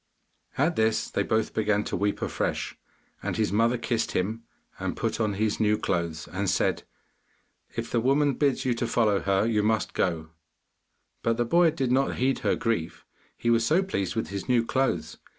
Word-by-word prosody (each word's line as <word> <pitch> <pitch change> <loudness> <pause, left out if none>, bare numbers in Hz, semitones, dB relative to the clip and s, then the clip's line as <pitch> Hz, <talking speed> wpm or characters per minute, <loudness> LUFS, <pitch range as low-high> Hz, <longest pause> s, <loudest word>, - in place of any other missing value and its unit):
At 160 +6 +1
this 110 0 +1
they - - 0
both 110 0 0
began 105 -1 +1
to - - -3
weep 100 0 -1
afresh, - - -2 0.5
and - - -3
his 110 -1 +1
mother 115 +4 +2
kissed 115 -1 -1
him, 110 +5 -1 0.4
and - - -3
put - - -2
on 105 -2 +1
his 105 +1 0
new 105 -1 +3
clothes 85 -4 -2
and 95 +2 -2
said, - - +1 0.9
'If - - -4
the 120 - +2
woman 140 +4 +3
bids 135 -1 +1
you 125 - +2
to 120 0 -2
follow 110 -4 +2
her, 100 +1 +1
you 110 -2 +2
must 110 +1 0
go,' 80 -3 -1 0.9
but 115 0 +1
the 120 - +1
boy 170 +6 +4
did 135 -5 -1
not 135 +2 +2
heed 130 +2 +1
her - - +1
grief, 90 -8 -2 0.3
he 120 - +1
was 115 0 +3
so 165 +10 +3
pleased 100 - -2
with 110 - -2
his 100 +4 -5
new 120 -2 +3
clothes. 135 +2 -1
115 Hz, 185 wpm, -27 LUFS, 105-125 Hz, 0.9 s, boy